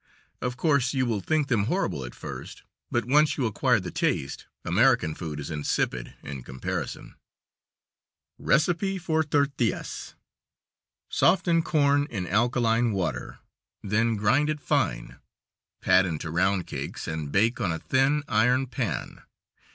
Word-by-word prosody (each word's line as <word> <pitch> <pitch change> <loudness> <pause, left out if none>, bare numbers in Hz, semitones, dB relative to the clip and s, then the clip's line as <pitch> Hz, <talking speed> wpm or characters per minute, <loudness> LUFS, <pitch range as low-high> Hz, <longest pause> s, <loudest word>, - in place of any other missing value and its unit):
Of 125 0 -3
course 140 -4 +2
you 130 -1 +2
will 115 -4 0
think 150 - +1
them 115 -7 +1
horrible 135 - -1
at - - -8
first, - - -8 0.3
but 120 -2 0
once 150 +4 +3
you 135 - 0
acquire 120 +2 +2
the 90 -2 -6
taste, 70 - -2 0.2
American 80 - +3
food 75 -2 -6
is 75 - -6
insipid 70 -4 -2
in 70 -2 -6
comparison. 65 +1 -5 1.3
Recipe 175 - +1
for 160 -3 0
tortillas: 140 -5 -1 0.9
Soften 175 -3 +3
corn 145 -3 +2
in 95 -6 -3
alkaline 115 +2 +2
water, 90 -4 -3 0.5
then 110 +3 +1
grind 120 +9 +2
it 155 -1 -1
fine, - - -1 0.6
pat 95 0 +4
into 80 -1 -4
round 95 +2 +1
cakes, - - -6
and 80 -2 -4
bake 110 +8 +2
on 90 - +1
a 80 - -2
thin, 135 - +1
iron 125 +5 +3
pan. 125 - -4
120 Hz, 135 wpm, -26 LUFS, 90-145 Hz, 1.3 s, pat